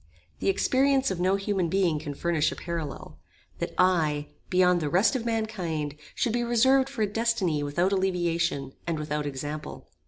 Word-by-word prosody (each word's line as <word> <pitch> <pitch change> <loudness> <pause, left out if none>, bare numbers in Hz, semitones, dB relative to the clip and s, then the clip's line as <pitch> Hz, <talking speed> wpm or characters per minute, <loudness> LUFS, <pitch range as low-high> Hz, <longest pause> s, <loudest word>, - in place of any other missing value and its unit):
The - - +1
experience 270 -6 +2
of 185 - -3
no 185 +2 +2
human 195 -3 -1
being 175 -4 +1
can 145 -2 -6
furnish 165 -1 +1
a - - -5
parallel: 165 -5 -6 0.4
That - - -4
I, 155 -5 +2 0.2
beyond 180 -1 +3
the 150 - -1
rest 190 - +3
of 235 -2 -2
mankind, 180 -10 -2 0.2
should 230 - 0
be 240 - +1
reserved 260 +3 +3
for 255 -5 -2
a - - +2
destiny 205 -8 0
without 170 +6 0
alleviation, 170 -7 0
and 165 -2 -1
without 150 -1 -2
example! 145 +2 -6
180 Hz, 165 wpm, -27 LUFS, 155-220 Hz, 0.4 s, beyond